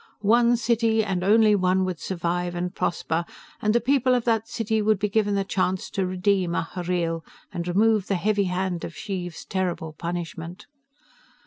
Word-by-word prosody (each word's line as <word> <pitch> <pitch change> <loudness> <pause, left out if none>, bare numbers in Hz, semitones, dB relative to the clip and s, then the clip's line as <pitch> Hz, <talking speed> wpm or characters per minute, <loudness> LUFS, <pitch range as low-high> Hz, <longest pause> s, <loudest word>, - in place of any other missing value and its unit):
One 235 +2 +5
city, 225 -1 +2
and 190 -3 -2
only 215 +2 +5
one, 185 -1 +2
would 185 -3 -3
survive 175 -1 -2
and 180 +1 -3
prosper, 170 -2 -1 0.4
and 215 +1 +2
the - - +5
people 255 +1 +2
of 245 - 0
that 225 -2 +1
city 220 -2 -1
would 215 0 +3
be 210 - 0
given 205 0 +1
the 195 - +1
chance 185 -1 -1
to 190 -2 -1
redeem 185 -1 +1
Ahhreel, 170 -1 -2 0.3
and 175 -3 -4
remove 210 +2 +2
the 195 - +1
heavy 200 +2 +1
hand 180 -1 -2
of 165 - -6
Xheev's 175 -3 -5
terrible 175 -4 -2
punishment. 170 +2 -6
190 Hz, 165 wpm, -25 LUFS, 175-215 Hz, 0.4 s, One